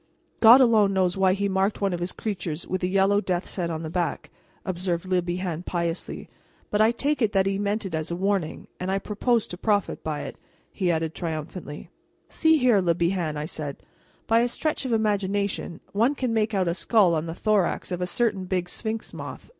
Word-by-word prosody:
"God 235 +3 +9
alone 215 -5 +4
knows 185 -2 +2
why 190 -1 +3
he 200 +1 0
marked 195 +1 0
one 195 -2 0
of 175 - -2
his 175 +1 -2
creatures 175 -7 -4
with 185 0 -3
a 180 - +1
yellow 195 +2 +3
death's 180 -2 -3
head 175 -3 -1
on 160 0 -4
the 160 - -4
back," 175 -1 -2 0.3
observed 180 -1 -2
Le 185 -1 +1
Bihan 175 -1 -3
piously, 170 -1 -3 0.4
"but 210 - +2
I 220 - +6
take 280 +5 0
it 215 -2 +2
that 190 -1 +3
he 195 0 0
meant 205 +1 -1
it 185 - -5
as 160 +1 -2
a 170 - -2
warning; 190 -3 -1
and 180 - -3
I 195 - +1
propose 220 +3 0
to 175 - -6
profit 205 -3 0
by 155 -2 -3
it," - - -8 0.3
he 185 - -1
added 160 -1 0
triumphantly. 160 -1 -6 0.4
"See 320 0 +4
here, 245 -7 +4
Le 170 -2 +2
Bihan," 170 -3 0
I 150 - -3
said; 150 -3 -6 0.4
"by 225 +1 +4
a 240 - +3
stretch 300 +3 -2
of 255 - -2
imagination 200 -5 -1
one 235 +8 +2
can 255 -4 -1
make 220 -1 +1
out 185 -2 +1
a 170 - +1
skull 195 -1 +3
on 160 0 -1
the 165 - -5
thorax 205 -3 0
of 180 0 -3
a 180 - 0
certain 200 0 0
big 180 -1 -2
sphinx 220 +2 -4
moth. - - -8
190 Hz, 210 wpm, -25 LUFS, 175-215 Hz, 0.4 s, God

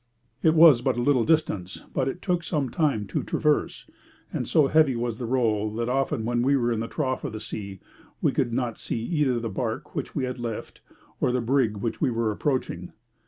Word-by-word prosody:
It 160 0 +4
was 155 -7 +8
but 125 -1 0
a - - 0
little 135 -4 +3
distance, 105 - 0
but 130 - 0
it 150 +7 -4
took 175 -2 0
some 150 -6 -1
time 140 -10 +1
to 95 - -2
traverse, 150 -2 0 0.5
and - - -2
so 155 - +4
heavy 150 -2 +4
was 120 -1 -3
the 120 - -3
roll 110 -4 +1
that 115 +1 -1
often 135 -2 0
when 120 0 +1
we 140 +3 +3
were 120 -2 +1
in 115 - 0
the 115 - -3
trough 130 -2 -2
of 140 -7 -4
the 110 - -5
sea, 100 -3 -7 0.4
we - - +2
could - - 0
not 120 -1 -2
see - - -3
either 140 -4 +1
the 115 - -3
barque 110 +2 -4
which - - -4
we 140 - 0
had 125 0 -3
left 115 -2 -6 0.4
or - - +2
the 125 - +1
brig 120 -3 +1
which 110 +3 -3
we 145 - +3
were 115 -2 0
approaching. 105 - -2
125 Hz, 215 wpm, -26 LUFS, 115-140 Hz, 0.5 s, was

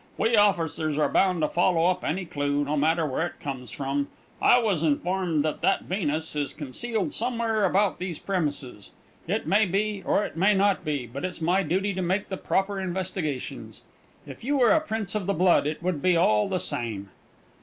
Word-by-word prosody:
"We 230 +1 +2
officers 165 -7 +2
are 150 - +3
bound 185 -3 +2
to - - +3
follow 170 0 +2
up 180 0 +1
any 180 +3 -2
clue, 145 -2 -1
no 150 +2 -1
matter 160 +3 +2
where 150 +4 -1
it - - -13
comes 130 -4 -6
from. 140 +2 -2 0.3
I - - +6
was 210 -9 +1
informed 165 +1 0
that 155 -1 -2
that 195 - +2
Venus 160 -5 -2
is 145 -2 -1
concealed 200 - -3
somewhere 230 -3 +1
about 195 +2 +1
these 180 -3 -4
premises. 145 - -3 0.4
It 205 +6 -1
may 205 +1 +3
be, 200 +2 -1
or 205 - +1
it - - -8
may 195 +5 +3
not 200 0 +2
be; 145 -5 -2
but 130 +4 -8
it's 185 -1 -4
my 175 +4 +2
duty 195 +5 0
to 185 - -3
make 185 +3 -1
the 190 - -3
proper 195 +1 -1
investigations. 180 -6 -4 0.4
If - - -11
you 285 +4 0
were 245 -3 +5
a 320 - +4
prince 220 - -3
of 210 -3 -2
the 200 - +1
blood, 175 -3 +3
it 155 +3 -4
would 175 -5 -1
be 180 0 +3
all 105 -11 +3
the 185 - 0
same." 115 - -4
180 Hz, 195 wpm, -26 LUFS, 150-195 Hz, 0.4 s, I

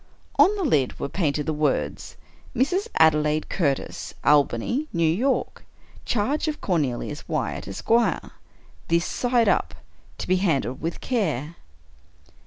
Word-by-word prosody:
On 365 +9 +6
the 400 - -2
lid 145 - +1
were - - -3
painted 150 -5 -1
the 155 - -1
words 150 0 -1 0.2
— - - -26
"Mrs. 360 - +1
Adelaide 150 -1 +3
Curtis. 140 -7 -2
Albany, 150 - +2
New 170 - 0
York. 235 +12 0 0.4
Charge 260 +9 0
of 305 -1 -2
Cornelius 150 -10 -2
Wyatt, - - -2
Esq. 100 - -6 1.0
This 170 +1 +2
side 245 -2 +1
up. 85 - +1 0.4
To - - -5
be 185 - +3
handled 150 -8 0
with 165 +1 -4
care." 170 - -1
170 Hz, 130 wpm, -24 LUFS, 150-245 Hz, 1.0 s, On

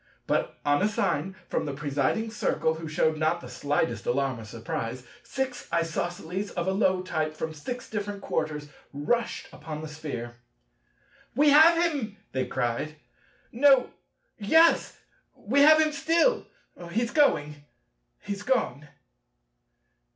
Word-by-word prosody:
But - - -1
on 145 0 +3
a 205 - +4
sign 190 -3 -1
from - - -2
the 140 - -4
presiding 145 +10 -1
Circle—who 160 -6 -1
shewed 155 0 +1
not 160 +2 +1
the 125 - -10
slightest 145 +5 -1
alarm 135 -1 0
or 110 - -9
surprise—six 130 - -5
Isosceles 175 +3 -2
of 175 - -3
a - - +2
low 190 -2 +2
type 155 -3 -2
from 160 0 -4
six 245 - -6
different 205 -1 -4
quarters 155 -5 -3 0.3
rushed 190 +12 -1
upon 155 0 -7
the - - -5
Sphere. 140 -6 -6 1.0
"We 290 +2 +5
have 320 +3 +7
him," 270 -11 -2
they 130 -1 -1
cried; 120 +6 -2 0.6
"No; 270 +1 +4 0.5
yes; 320 +11 +4 0.4
we 260 +7 0
have 310 +2 +8
him 310 -1 +3
still! 330 - +2 0.4
he's 230 +6 -1
going! 150 - +2 0.6
he's 200 0 -5
gone!" 205 - -1
170 Hz, 130 wpm, -27 LUFS, 145-240 Hz, 1.0 s, have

